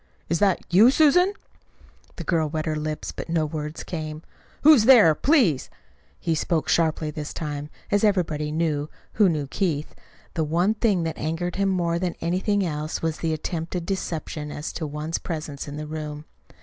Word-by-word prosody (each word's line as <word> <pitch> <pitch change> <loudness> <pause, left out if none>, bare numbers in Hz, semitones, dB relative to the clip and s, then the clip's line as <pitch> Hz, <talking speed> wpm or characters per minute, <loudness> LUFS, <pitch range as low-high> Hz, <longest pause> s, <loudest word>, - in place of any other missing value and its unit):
"Is 165 0 +1
that 195 -3 +3
you, 215 +7 +8
Susan?" 320 +7 +5 0.8
The - - -6
girl 160 -3 +1
wet 155 0 -3
her 155 -1 -1
lips, 155 0 -3
but - - -7
no 165 -2 +1
words 150 0 -5
came. 155 -2 -5 0.4
"Who's 290 -7 +7
there, 225 -11 +8
please?" 225 - +2 0.5
He 165 - 0
spoke 160 0 0
sharply 160 -2 +1
this 150 -1 -6
time. 150 -2 -4 0.2
As 205 +1 +2
everybody 160 -7 +1
knew 155 -2 -1 0.2
who 210 -3 +4
knew 150 -4 -1
Keith 155 0 -2 0.4
the 160 - 0
one 170 +7 +2
thing 210 -5 +1
that 160 -1 -4
angered 165 +4 -2
him 195 0 +2
more 170 -2 0
than 180 -1 -2
anything 190 +3 0
else 155 -1 -3
was 160 -1 -1
the 165 - -1
attempted 165 +2 -3
deception 160 -5 -4
as 145 +2 -5
to 160 - -4
one's 150 +3 -3
presence 155 -4 -5
in 145 +1 -6
the 150 - -5
room. 150 -1 -6
160 Hz, 175 wpm, -24 LUFS, 150-185 Hz, 0.8 s, you